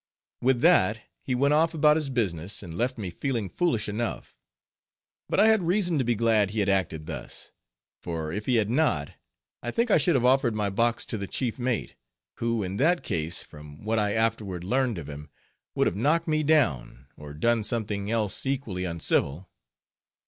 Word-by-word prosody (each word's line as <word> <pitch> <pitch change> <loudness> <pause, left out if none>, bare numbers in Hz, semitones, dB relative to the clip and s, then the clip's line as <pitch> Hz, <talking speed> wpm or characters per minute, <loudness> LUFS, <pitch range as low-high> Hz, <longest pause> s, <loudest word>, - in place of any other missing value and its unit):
With 125 -1 +2
that, 110 - +4 0.2
he 130 - -2
went 140 +3 +3
off 160 +2 +2
about 150 -1 +5
his 155 -3 -1
business, 100 -5 -2
and 85 -3 -8
left 125 +7 -1
me 95 -5 -5
feeling 115 0 -2
foolish 135 - 0
enough. 110 +3 -4 0.9
But - - +1
I 215 +2 +6
had 220 -2 +4
reason 175 -2 +1
to - - +2
be 120 0 +1
glad 110 -2 +2
he 110 +2 -3
had 100 -1 +1
acted 85 -5 0
thus, - - -8 0.5
for 80 -2 -4
if 105 +2 -5
he 125 - +3
had 110 -3 +2
not, 115 - +1 0.5
I 120 - -4
think 235 - 0
I - - +6
should 155 +2 +2
have 125 -2 +2
offered 125 -3 +3
my 105 -2 -1
box 115 +3 +1
to 110 - -4
the 100 - -4
chief 125 +2 -2
mate, 125 -2 -2 0.4
who 115 -2 -1
in 95 +1 -4
that 170 +7 +2
case, 85 -4 -2
from 75 +1 -13
what 110 +1 0
I 105 -1 +1
afterward 110 -5 -1
learned 125 +2 0
of 80 - -7
him, 75 0 -9 0.5
would - - +2
have - - 0
knocked 150 - +1
me 155 -1 +1
down, 120 - +1
or 75 -1 -10
done 115 +8 +2
something 105 -2 -2
else 110 -4 -1
equally 130 -10 -2
uncivil. 85 -1 -1
115 Hz, 190 wpm, -26 LUFS, 95-135 Hz, 0.9 s, I